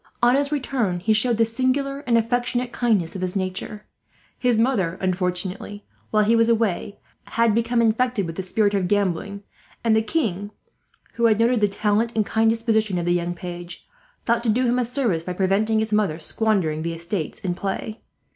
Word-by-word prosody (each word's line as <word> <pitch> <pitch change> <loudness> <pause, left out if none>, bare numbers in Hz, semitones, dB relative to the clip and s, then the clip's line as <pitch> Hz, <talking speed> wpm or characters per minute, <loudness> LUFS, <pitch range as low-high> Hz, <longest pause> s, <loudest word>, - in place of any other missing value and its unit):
"On 240 +1 +6
his 280 +1 +1
return 250 -10 -1
he 220 +5 +2
showed 230 +2 +2
the 225 - +4
singular 260 +4 -1
and 235 -1 +4
affectionate 245 +1 0
kindness 215 -10 0
of 190 - -5
his 185 +1 -2
nature. 195 +3 -4 0.5
His 245 -3 +2
mother, 215 -8 +1
unfortunately, 185 +2 -3 0.2
while 215 -1 +3
he 225 +3 +3
was 230 0 +3
away, 215 -3 0 0.3
had 230 -2 +2
become 235 +1 +1
infected 230 -2 +1
with 165 -1 -6
the 190 - -3
spirit 205 +2 +1
of 195 -3 +1
gambling; 200 0 -1 0.4
and 225 -2 +3
the 220 - +4
king, 215 - -2 0.6
who 235 - +1
had 220 -2 +4
noted 230 0 +3
the 205 - +5
talent 210 +3 0
and 215 -2 +2
kind 225 +1 +2
disposition 220 -3 +1
of 170 - -2
the 175 - +2
young 175 0 -1
page, 175 0 -8 0.4
thought 235 0 +2
to 235 - -1
do 250 +4 +2
him 245 +1 +2
a 250 - +1
service 235 -9 0
by 180 +2 -5
preventing 195 +4 +1
his 220 0 -1
mother 205 -7 +1
squandering 175 -3 0
the 165 +1 -3
estates 170 0 -4
in 185 -4 -2
play. 200 +4 -4
215 Hz, 190 wpm, -23 LUFS, 185-235 Hz, 0.6 s, On